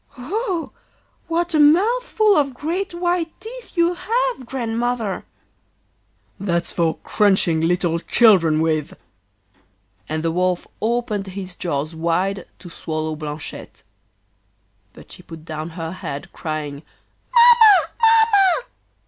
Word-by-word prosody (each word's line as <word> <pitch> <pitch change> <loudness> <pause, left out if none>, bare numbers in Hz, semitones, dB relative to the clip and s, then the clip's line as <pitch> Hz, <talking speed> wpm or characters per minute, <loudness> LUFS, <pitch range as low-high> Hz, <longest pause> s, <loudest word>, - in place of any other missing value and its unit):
'Oh! 360 - -3 0.6
what 340 +1 -1
a 310 - +2
mouthful 425 +7 +3
of 275 -5 +1
great 340 +8 -3
white 345 -1 -2
teeth 470 -3 -11
you 340 +1 +3
have, 470 - -2
Grandmother!' 235 -4 -2 1.1
'That's 175 -3 -1
for 165 -2 0
crunching 190 -6 +2
little 170 0 0
children 170 -7 +4
with!' 155 -1 -1 1.1
And 155 +1 -2
the 165 - 0
Wolf 180 +1 0 0.2
opened 220 -3 -1
his 185 -1 -7
jaws 155 -2 -3
wide 180 +4 -1
to - - -13
swallow 155 -2 -4
Blanchette. 150 0 -8 1.1
But - - -16
she - - -11
put 160 -1 -12
down 155 0 -5
her 165 -1 -4
head 145 -6 -7
crying: 155 -3 -5 0.5
'Mamma! 470 -4 +6
Mamma! 450 -2 +4
215 Hz, 115 wpm, -21 LUFS, -, 1.1 s, Mamma